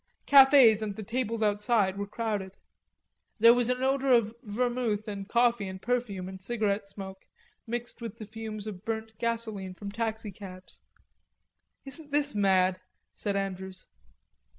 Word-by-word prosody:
Cafes 265 -6 +7
and 210 -2 -3
the 215 - -6
tables 230 0 -2
outside 210 -1 +2
were 200 0 -4
crowded. 205 -3 -3 0.8
There 230 +1 +8
was 245 0 +1
an 250 +1 0
odor 270 0 +2
of 230 -3 +4
vermouth 235 -1 -1
and 200 -1 -6
coffee 235 -4 +2
and 190 0 -7
perfume 220 -5 -2
and 190 0 -9
cigarette 205 -1 -1
smoke 195 -1 -9 0.4
mixed 240 +1 -5
with 230 -3 -6
the 215 - -7
fumes 215 -1 -7
of 200 -3 -7
burnt 220 0 -4
gasoline 220 -5 -2
from 200 +1 -7
taxicabs. 205 -4 -6 1.0
"Isn't 295 +2 -5
this 290 0 +1
mad?" 190 -2 +2 0.3
said 205 -2 -2
Andrews. 190 -1 -4
215 Hz, 140 wpm, -29 LUFS, 195-235 Hz, 1.0 s, There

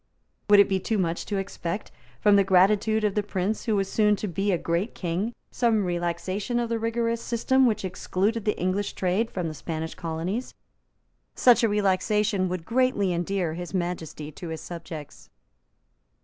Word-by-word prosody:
Would 205 0 +8
it 200 - +7
be 190 -1 +1
too 220 +4 -1
much 170 -3 -1
to 205 - -1
expect, 195 0 -4 0.3
from 205 -1 +5
the 200 - +5
gratitude 200 +4 +3
of 210 -2 +2
the 210 - +1
prince 200 +1 -2
who 220 -3 +1
was 195 -1 +1
soon 210 0 +3
to 210 - -4
be 195 +3 0
a 180 - +2
great 170 +7 -2
king, 180 +5 -2 0.2
some 225 -5 +2
relaxation 180 +6 -2
of 240 -1 0
the 230 -1 0
rigorous 230 +1 -1
system 260 +3 +2
which 215 -4 0
excluded 195 +4 -1
the 210 0 0
English 185 +3 -1
trade 195 +5 0
from 180 -6 -3
the 155 - -4
Spanish 160 +1 -5
colonies? 170 +8 -4 0.8
Such 245 -1 +5
a 230 - +3
relaxation 200 -1 +1
would 180 -2 -4
greatly 230 -6 +2
endear 175 -1 -1
His 175 +3 -6
Majesty 170 -4 -3
to 170 - -8
his 160 -1 -5
subjects. 165 -3 -9
195 Hz, 175 wpm, -26 LUFS, 175-215 Hz, 0.8 s, Would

